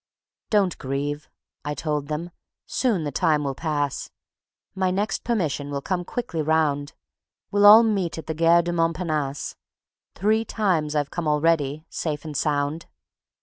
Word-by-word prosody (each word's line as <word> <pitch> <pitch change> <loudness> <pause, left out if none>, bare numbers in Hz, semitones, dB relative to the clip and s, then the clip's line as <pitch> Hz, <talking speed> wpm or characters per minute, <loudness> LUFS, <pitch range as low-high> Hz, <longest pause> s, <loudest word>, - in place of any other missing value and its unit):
"Don't 200 -5 +2
grieve," 145 +2 -3 0.3
I 145 0 -3
told 150 -2 -2
them. 160 +3 -4 0.3
"Soon 225 -10 0
the 145 - -3
time 150 0 +2
will 140 -1 -1
pass; 145 -1 -2 0.6
My 190 -1 0
next 200 +4 -1
permission 160 - -1
will 140 -1 -4
come 180 -2 -2
quickly 180 -9 -3
round; 150 -2 +1 0.6
We'll 205 0 +5
all 220 +3 +10
meet 195 -7 0
at 160 - -7
the 160 - -3
Gare 165 +2 +4
du 175 0 -2
Montparnasse; 160 -4 -1 0.6
Three 215 +4 +2
times 175 -10 0
I've 145 -2 0
come 175 -3 -3
already, 150 -1 +1
safe 150 -2 -4
and 155 -2 -6
sound." 145 +2 -1
160 Hz, 145 wpm, -24 LUFS, 145-180 Hz, 0.6 s, all